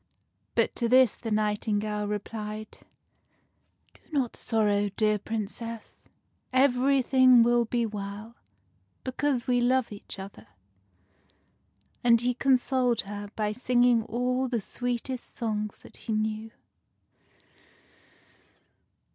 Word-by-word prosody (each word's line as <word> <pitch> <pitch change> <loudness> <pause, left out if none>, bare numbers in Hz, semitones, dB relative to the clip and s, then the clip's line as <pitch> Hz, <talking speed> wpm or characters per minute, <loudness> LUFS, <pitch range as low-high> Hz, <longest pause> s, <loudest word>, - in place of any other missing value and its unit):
But - - +1
to 235 -2 0
this 255 -2 +5
the 230 - -6
nightingale 210 0 -1
replied, 210 +1 -5 0.4
— - - -43
" - - -42
Do - - -24
not 270 -6 -1
sorrow, 205 -2 +1
dear 215 +1 +1
Princess: 225 +2 -6 0.5
everything 260 -1 +5
will 240 0 +3
be 235 +1 0
well, 210 +1 -6 0.7
because 260 -1 -1
we 245 -1 +2
love 255 0 +2
each 205 0 -9
other." 195 +1 -10 1.6
And 235 -1 +5
he 245 +1 0
consoled 255 -2 +2
her 205 +1 -7
by 210 -1 -1
singing 245 0 +3
all 250 +3 -1
the 240 -2 -1
sweetest 245 +3 -4
songs 215 -3 -3
that - - -12
he 225 - -4
knew. 215 +1 -2
230 Hz, 110 wpm, -27 LUFS, 210-250 Hz, 1.6 s, this